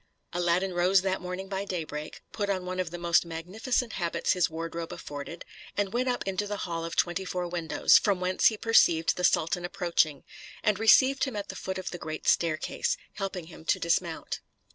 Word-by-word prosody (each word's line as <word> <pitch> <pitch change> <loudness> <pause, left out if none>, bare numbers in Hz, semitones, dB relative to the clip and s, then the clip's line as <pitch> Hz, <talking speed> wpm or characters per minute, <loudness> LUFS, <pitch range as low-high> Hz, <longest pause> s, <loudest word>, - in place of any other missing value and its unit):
Aladdin 175 +2 +1
rose 180 +2 +4
that 190 -1 -1
morning 180 +1 -5
by 195 0 -3
daybreak, 155 -5 -5
put 205 -2 -2
on 185 -2 -1
one 185 0 -4
of 180 -2 -1
the 175 - -6
most 170 0 +3
magnificent 205 +9 -2
habits 170 -2 0
his 180 -2 +2
wardrobe 165 +1 -5
afforded, 145 +4 -7 0.3
and 200 -1 0
went 250 +2 +1
up 245 -5 -2
into 195 +2 -1
the 205 0 -3
hall 165 -2 -3
of 165 0 -5
twenty 175 +2 +1
four 180 -1 -3
windows, 170 -2 +4
from 200 -3 +1
whence 185 0 +3
he 220 - +2
perceived 170 -8 +4
the 180 - -4
sultan 170 0 +2
approaching, 170 -5 0 0.4
and 210 -2 +2
received 265 +5 +5
him 265 -5 -5
at 205 -1 -4
the - - -6
foot 190 0 -4
of 185 - -5
the 175 - -6
great 155 -1 -6
staircase, 160 -2 +1 0.2
helping 195 -4 -4
him 160 -1 -12
to - - +3
dismount. 170 -1 -1
180 Hz, 195 wpm, -28 LUFS, 170-195 Hz, 0.4 s, received